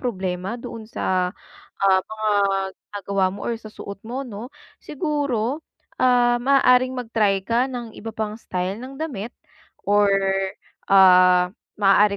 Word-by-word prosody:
problema 190 -3 -3
doon 230 -2 -8
sa, 185 -4 -1 0.5
ah, 190 -1 +4
mga 215 0 -4 0.5
ginagawa 200 -1 -2
mo 200 - -9
or 235 - 0
sa 215 - -10
suot 200 -1 -8
mo 250 +4 -4
'no. 225 +1 -8 0.3
Siguro, 285 -3 -2 0.4
ah, 245 -1 +4
maaaring 255 -1 +4
mag-try 220 -5 +1
ka 235 +4 +2
ng 240 -3 -7
iba 225 +1 -7
pang 215 -1 -3
style 185 -2 -3
ng 265 +2 -9
damit, 245 -8 -4 0.6
or 205 0 +4 0.8
ah, 180 -2 +6 0.3
maaari 200 +1 +4
215 Hz, 130 wpm, -22 LUFS, 195-245 Hz, 0.8 s, ah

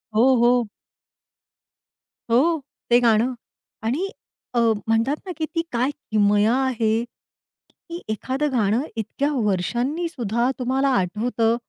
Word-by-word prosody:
हो, 255 +4 +5
हो. 240 -2 +3 1.6
हो 310 +8 +3 0.3
ते 240 - +7
गाणं. 235 +1 +3 0.5
आणि 290 - -1 0.4
अ, 240 - +2 0.3
म्हणतात 225 +5 +2
ना, 370 - -5
की 315 - -1
ती 330 - +2
काय 245 +2 +1 0.2
किमया 210 +1 +3
आहे 230 -3 +1 0.8
की 340 0 -8
एखादं 265 +7 -1
गाणं 225 -1 +2
इतक्या 230 +7 -2
वर्षांनीसुद्धा 240 - -1
तुम्हाला 265 +2 +1
आठवतं 225 +4 +1
240 Hz, 110 wpm, -23 LUFS, 220-270 Hz, 1.6 s, ते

